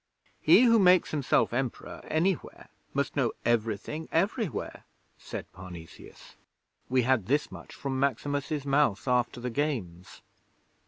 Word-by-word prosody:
'He - - +6
who 230 -2 +5
makes 185 -2 +5
himself 145 -5 +1
Emperor 130 -1 -3
anywhere 175 +3 -1 0.2
must - - -2
know - - +1
everything, 120 +6 -1
everywhere,' 195 - -1 0.4
said - - -7
Parnesius. 90 -3 -12 0.5
'We 130 0 +3
had 120 -6 +1
this 145 +4 +1
much - - -11
from 135 -1 -3
Maximus's 140 +2 -1
mouth 140 -6 +1
after 125 -1 +1
the 125 0 -4
Games.' 115 - -4
135 Hz, 120 wpm, -28 LUFS, 115-155 Hz, 0.5 s, He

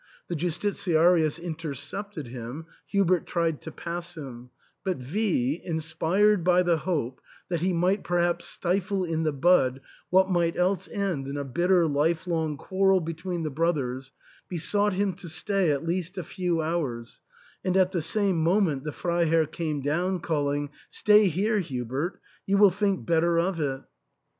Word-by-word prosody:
The 175 - -2
Justitiarius 170 -1 +2
intercepted 165 +2 -5
him; 125 +6 -7 0.2
Hubert 185 -4 +2
tried 165 -3 -1
to 160 - -7
pass 170 +1 -6
him; 125 -4 -8 0.3
but 190 -2 -1
V 150 - 0
y - - -9
inspired 165 +5 +2
by 180 +1 +4
the 175 -2 +2
hope 145 -7 -2 0.3
that 170 -3 -1
he 185 +2 +1
might 180 +3 +1
perhaps 175 0 0
stifle 190 +2 -1
in 165 -2 -1
the 155 -1 +1
bud 135 -3 +3 0.3
what 190 +1 +5
might 170 -3 +1
else 180 0 +1
end 190 -10 -2
in 140 +1 -4
a 140 - -2
bitter 175 +6 +2
life 160 +4 +1
long 160 -4 -1
quarrel 195 +4 +2
be 165 -1 -4
tween 170 +1 -4
the 155 - -2
brothers, 135 -4 -1 0.4
besought 205 +4 +1
him 195 0 0
to 180 -3 -8
stay, 190 +2 0
at 145 +2 0
least 180 +2 -2
a 185 - -3
few 175 -1 -1
hours, 140 -8 -3 0.4
and 185 0 +1
at 185 -1 +4
the 175 -4 -1
same 195 +3 +1
moment 165 -5 +2
the 150 - -3
Freiherr 165 0 +1
came 155 -2 -3
down 175 +6 0
calling, 145 -3 -1
" - - -27
Stay 210 -1 +5
here, 205 +6 +1
Hubert! 135 - -3 0.3
you 200 +1 +3
will 200 -1 +7
think 195 0 -1
better 170 0 +2
of 175 0 0
it." 135 -3 -2
170 Hz, 165 wpm, -26 LUFS, 155-185 Hz, 0.4 s, will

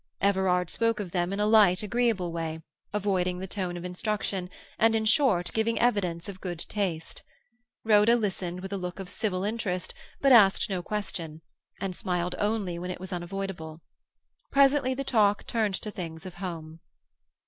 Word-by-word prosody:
Everard 190 -3 +2
spoke 230 -1 +1
of 190 -4 -4
them 175 0 0
in 200 - -2
a 210 - +2
light, 210 -4 +5
agreeable 220 -5 +1
way, 160 -1 -4 0.3
avoiding 185 -3 0
the 185 - -5
tone 185 -2 -3
of 175 - -7
instruction, 190 -1 -2 0.3
and, 225 0 +4
in 220 0 +1
short, 215 - +3
giving 225 +1 +1
evidence 185 -8 +1
of 190 -2 -8
good 175 -2 -4
taste. 175 -3 -3 0.6
Rhoda 215 +1 +6
listened 185 -5 -2
with 190 +1 -6
a - - -1
look 180 0 -5
of 190 -1 -6
civil 195 -4 -1
interest, 205 -4 -2 0.3
but 275 - +4
asked 205 -4 +6
no 185 -2 -1
question, 175 -6 -4 0.4
and 190 -2 -3
smiled 180 0 -1
only 205 -5 -1
when 180 +1 -5
it 180 - -5
was 185 +1 -6
unavoidable. 175 -3 -5 0.7
Presently 275 -1 +4
the 275 - -3
talk 210 -6 +2
turned 220 -5 0
to 210 - -5
things 165 -4 -7
of 185 - -7
home. 165 -3 -6
190 Hz, 170 wpm, -28 LUFS, 180-215 Hz, 0.7 s, Rhoda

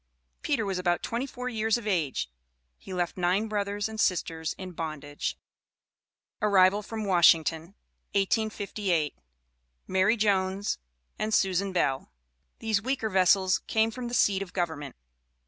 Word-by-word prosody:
Peter 220 - 0
was 190 -2 -2
about 175 -1 0
twenty 240 +4 -2
four 250 -1 -6
years 220 -2 +1
of 235 - -8
age. 165 - 0 0.5
He - - -11
left 180 -1 -2
nine 185 +4 +1
brothers 205 -1 -1
and 220 0 -7
sisters 165 -5 0
in 185 -1 -7
bondage. 155 -3 -4 1.0
ARRIVAL 200 -1 +5
FROM 220 +1 -5
WASHINGTON, 170 -1 +3 0.4
1858. 200 -5 0 0.7
MARY 190 +5 +2
JONES 195 -1 +1 0.4
AND 215 0 +1
SUSAN 190 +1 +1
BELL. 135 -7 0 0.5
These 220 -3 0
"weaker 240 -2 -1
vessels" 185 0 +4
came 220 0 +2
from 245 +1 -5
the 240 - -3
seat 195 -4 +3
of 185 -2 -6
government. 160 -6 -3
195 Hz, 130 wpm, -28 LUFS, 175-215 Hz, 1.0 s, ARRIVAL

